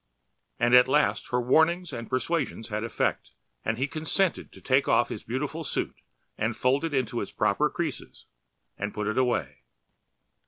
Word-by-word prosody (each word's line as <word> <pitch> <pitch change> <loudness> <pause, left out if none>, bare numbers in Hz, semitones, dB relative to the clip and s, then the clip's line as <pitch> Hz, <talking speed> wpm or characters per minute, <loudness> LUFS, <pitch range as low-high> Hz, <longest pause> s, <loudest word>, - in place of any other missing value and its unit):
And 120 +1 +2
at 125 0 +8
last 150 +3 +2
her 125 - +1
warnings 160 +8 +2
and 115 -1 -6
persuasions 130 -2 -1
had 105 +1 -2
effect 115 - -2 0.3
and 110 - -1
he 130 - +1
consented 165 +4 0
to - - -14
take 135 +1 +2
off 120 - +3
his 105 - -6
beautiful 145 +7 -3
suit - - -3 0.4
and 110 +1 0
fold 130 +4 +2
it 165 - -1
into 130 -5 -1
its - - -5
proper - - +1
creases - - -5 0.5
and 105 +1 -3
put 105 - -2
it 110 +3 0
away. 120 - 0
130 Hz, 165 wpm, -27 LUFS, 115-150 Hz, 0.5 s, at